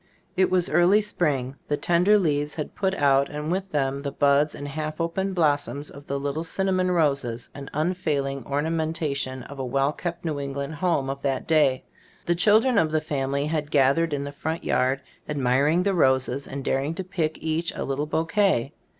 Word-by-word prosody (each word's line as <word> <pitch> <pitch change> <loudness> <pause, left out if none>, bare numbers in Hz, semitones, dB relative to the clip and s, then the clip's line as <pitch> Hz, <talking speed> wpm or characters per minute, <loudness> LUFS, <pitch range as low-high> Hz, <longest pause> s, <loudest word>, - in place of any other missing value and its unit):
It 190 -1 +3
was 180 -1 +2
early 175 +6 +4
spring. 140 -10 -1
The 145 - 0
tender 180 +7 +4
leaves 150 -5 0
had 150 - -5
put 190 -1 -1
out 140 -3 +3
and 150 +2 -4
with 190 +1 -2
them 140 -3 -1
the 140 -1 -3
buds 145 +2 +2
and 145 - -6
half 155 +1 -4
open 190 +4 -1
blossoms 145 -3 0
of 140 0 -13
the 140 0 -2
little 145 +3 -2
cinnamon 185 +1 0
roses, 140 -9 0
an 140 -1 -8
unfailing 150 -4 -1
orna 145 +3 -1
mentation 155 -5 -2
of 140 -1 -10
a - - -2
well 135 +3 +1
kept 170 +2 -5
New 155 -3 -2
Eng 140 -1 -4
land 140 +2 -4
home 160 -4 0
of 135 +1 -4
that 135 -2 -1
day. 145 -5 +3 0.4
The 175 - +2
children 215 +6 +4
of 160 - +2
the 155 0 +1
family 140 -2 -2
had 150 -1 -2
gathered 145 +3 +3
in 140 -1 -1
the 140 - -5
front 160 +3 -4
yard, 130 +2 +1 0.3
admiring 145 +4 +2
the 200 0 +1
roses 130 -4 +2
and 135 0 -6
daring 140 +4 0
to 190 - -4
pick 165 -4 -2
each 160 +1 -1
a - - -3
little 140 +2 -2
bouquet. 165 - +1
150 Hz, 195 wpm, -25 LUFS, 140-170 Hz, 0.4 s, early